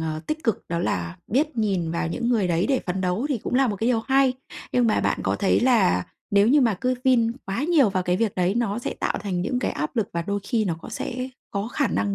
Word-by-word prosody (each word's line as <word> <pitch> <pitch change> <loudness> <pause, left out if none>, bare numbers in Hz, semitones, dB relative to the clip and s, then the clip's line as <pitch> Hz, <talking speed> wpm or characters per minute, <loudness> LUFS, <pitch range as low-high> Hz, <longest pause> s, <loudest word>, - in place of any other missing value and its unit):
ờ, 155 -1 -3
tích 310 +1 -3
cực 225 -6 0
đó 170 0 -1
là 85 - -2
biết 295 +5 0
nhìn 190 -7 0
vào 170 -1 -1
những 235 +8 -2
người 215 -7 +2
đấy 170 +2 +1
để 265 -2 +2
phấn 185 +1 -2
đấu 185 +8 0
thì 270 - 0
cũng 220 - -4
là 265 +1 +4
một 210 -4 -2
cái 220 +4 -1
điều 235 -3 +2
hay. 265 +2 +3 0.4
Nhưng 245 -1 +3
mà 220 - +2
bạn - - 0
có - - 0
thấy 200 - +2
là 220 - +3 0.3
nếu 200 +1 +4
như 290 +4 +5
mà 230 -5 +3
cứ 255 0 +1
vin 235 -3 +3
quá 195 +8 -2
nhiều 300 - +4
vào 185 -1 0
cái 180 0 +1
việc 220 0 0
đấy 180 +1 +1
nó 230 -2 0
sẽ - - -4
tạo - - 0
thành 185 -4 -2
những 245 +6 -1
cái - - -1
áp 150 - -4
lực, 220 - +1
và 170 - -1
đôi 200 +3 -2
khi 225 +1 0
nó 175 -5 -1
có - - -10
sẽ 255 +1 -4 0.2
có 200 +1 -2
khả 280 +2 0
năng 200 -2 0
215 Hz, 270 wpm, -24 LUFS, 185-250 Hz, 0.4 s, như